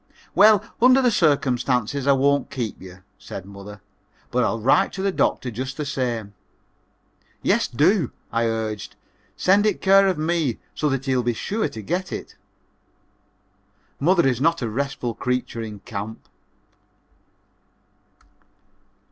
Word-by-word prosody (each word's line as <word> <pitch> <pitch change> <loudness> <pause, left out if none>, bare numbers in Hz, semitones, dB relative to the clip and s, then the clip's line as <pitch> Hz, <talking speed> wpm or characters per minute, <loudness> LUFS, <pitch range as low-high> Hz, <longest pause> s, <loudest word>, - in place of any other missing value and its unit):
"Well, 210 0 +6 0.2
under 255 +2 +6
the 250 -2 +3
circumstances 135 - +1
I 140 - +6
won't 140 +1 +2
keep 120 -5 -5
you," 90 -1 -12 0.2
said 95 - -8
mother, 100 +1 -11 0.5
"but 125 0 +2
I'll 115 +1 0
write 120 +5 +3
to 190 - -4
the 195 - +1
doctor 130 -8 0
just 130 +4 -5
the 150 - -3
same." 120 -6 -3 1.1
"Yes, - - +2
do," 155 - +2 0.2
I 115 0 +1
urged, 110 -2 -3 0.4
"send 200 +3 +3
it 210 - 0
care 195 0 +5
of 185 -3 0
me 155 -5 0 0.2
so 150 - 0
that 135 -1 -2
he'll 130 -2 +1
be 120 0 0
sure 215 - -2
to 110 - -9
get 180 - -2
it." - - -7 1.6
Mother 170 +1 +3
is 125 -1 0
not 165 -2 +2
a 115 - -1
restful 135 -1 -3
creature 125 -2 -2
in 105 -3 -7
camp. 110 -1 -7
130 Hz, 140 wpm, -23 LUFS, 115-170 Hz, 1.6 s, Well